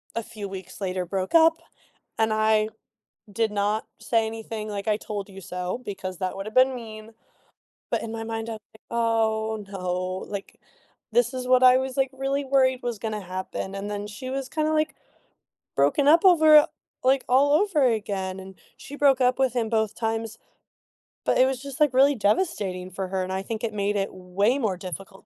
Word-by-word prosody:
a 230 Hz, -, -2 dB
few 215 Hz, -3 st, -7 dB
weeks 190 Hz, 0 st, -9 dB
later 185 Hz, -1 st, -2 dB
broke 190 Hz, +1 st, -3 dB
up. 325 Hz, 0 st, +7 dB, 0.6 s
And 220 Hz, 0 st, +2 dB
I 215 Hz, 0 st, +2 dB, 0.6 s
did 220 Hz, +1 st, 0 dB
not 210 Hz, +1 st, 0 dB
say 225 Hz, 0 st, +1 dB
anything 220 Hz, -1 st, -5 dB
like, 205 Hz, +1 st, -5 dB
"I 210 Hz, -, +2 dB
told 205 Hz, -2 st, -6 dB
you 195 Hz, 0 st, -10 dB
so," 180 Hz, +1 st, -4 dB
because 190 Hz, -2 st, -5 dB
that 185 Hz, 0 st, -3 dB
would've 195 Hz, +3 st, -6 dB
been 260 Hz, +1 st, +4 dB
mean. 220 Hz, -2 st, -9 dB, 0.8 s
But -, -, 0 dB
in 225 Hz, -, -5 dB
my 225 Hz, -, -4 dB
mind 225 Hz, 0 st, -4 dB
I -, -, -3 dB
was 215 Hz, -, -10 dB
like, 220 Hz, -, -19 dB
"Oh, 220 Hz, -2 st, 0 dB
no. 185 Hz, -2 st, -3 dB, 0.4 s
Like, 200 Hz, -1 st, -7 dB, 0.5 s
this 485 Hz, -, +3 dB
is 250 Hz, -1 st, -4 dB
what 255 Hz, 0 st, +5 dB
I 255 Hz, 0 st, +8 dB
was, 260 Hz, -1 st, -3 dB
like, 270 Hz, -1 st, +1 dB
really 270 Hz, +1 st, -2 dB
worried 260 Hz, -1 st, +2 dB
was 240 Hz, -3 st, -3 dB
gonna 215 Hz, -1 st, -3 dB
happen." 185 Hz, +1 st, -5 dB
And 200 Hz, +1 st, -5 dB
then 205 Hz, 0 st, -4 dB
she 210 Hz, +5 st, -8 dB
was 270 Hz, 0 st, -3 dB
kinda, 310 Hz, +1 st, 0 dB
like, 310 Hz, 0 st, +1 dB, 0.8 s
broken 145 Hz, -, +3 dB
up 330 Hz, +5 st, +6 dB
over, 315 Hz, -4 st, +7 dB, 0.4 s
like, 260 Hz, +1 st, +3 dB
all 275 Hz, +3 st, +4 dB
over 330 Hz, -3 st, +3 dB
again. 200 Hz, -5 st, -1 dB
And 190 Hz, 0 st, -12 dB, 0.2 s
she 285 Hz, -, -9 dB
broke 275 Hz, -3 st, +4 dB
up 250 Hz, +1 st, +3 dB
with 260 Hz, -3 st, +2 dB
him 235 Hz, -3 st, -1 dB
both 220 Hz, -1 st, 0 dB
times, 225 Hz, 0 st, -3 dB, 0.9 s
but -, -, +2 dB
it 255 Hz, -, +6 dB
was 260 Hz, -1 st, -2 dB
just 275 Hz, -2 st, -8 dB
like 295 Hz, -3 st, +4 dB
really 275 Hz, +2 st, +5 dB
devastating 205 Hz, -, 0 dB
for 190 Hz, +1 st, -4 dB
her, 190 Hz, 0 st, -1 dB
and 185 Hz, -, -5 dB
I 190 Hz, -, -1 dB
think 220 Hz, +2 st, -5 dB
it 225 Hz, -2 st, -2 dB
made 205 Hz, 0 st, -1 dB
it 195 Hz, -1 st, -1 dB
way 185 Hz, +7 st, 0 dB
more 215 Hz, -9 st, -1 dB
difficult 190 Hz, +1 st, -9 dB
220 Hz, 195 wpm, -25 LUFS, 200-260 Hz, 0.9 s, I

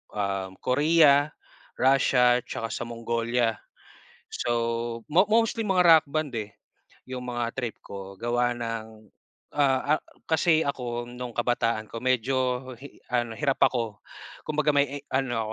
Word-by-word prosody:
um, 95 Hz, -2 st, -2 dB
Korea, 145 Hz, +1 st, +5 dB, 0.5 s
Russia, 125 Hz, -2 st, +4 dB
tsaka 115 Hz, -2 st, -5 dB
sa 120 Hz, -, -4 dB
Mongolia. 115 Hz, 0 st, -1 dB, 0.7 s
So, 115 Hz, -1 st, -2 dB
mo 190 Hz, +5 st, +5 dB
mostly 225 Hz, +1 st, +2 dB
mga 190 Hz, -4 st, +2 dB
rock 165 Hz, -2 st, +7 dB
band, 155 Hz, -2 st, -2 dB
eh, 105 Hz, 0 st, -9 dB, 0.5 s
yung 125 Hz, -1 st, -7 dB
mga 120 Hz, -1 st, -2 dB
trip 120 Hz, -4 st, -3 dB
ko 100 Hz, -1 st, -9 dB
gawa 120 Hz, +2 st, 0 dB
ng, 110 Hz, -2 st, -6 dB, 0.5 s
ah 140 Hz, +1 st, +3 dB
ah, -, -, -11 dB, 0.3 s
kasi 160 Hz, 0 st, +3 dB
ako 120 Hz, -3 st, -3 dB
nung 125 Hz, 0 st, -7 dB
kabataan 115 Hz, -2 st, 0 dB
ko, 115 Hz, -, -6 dB
medyo 130 Hz, 0 st, +1 dB, 0.4 s
hi 140 Hz, +3 st, -13 dB
ano 120 Hz, -2 st, -1 dB
hirap 140 Hz, -3 st, 0 dB
ako. 115 Hz, -4 st, -1 dB, 0.4 s
Kumbaga, 150 Hz, 0 st, +1 dB
may, 140 Hz, 0 st, +1 dB
eh, -, -, -37 dB
ano 120 Hz, -5 st, -1 dB
120 Hz, 135 wpm, -26 LUFS, 115-140 Hz, 0.7 s, rock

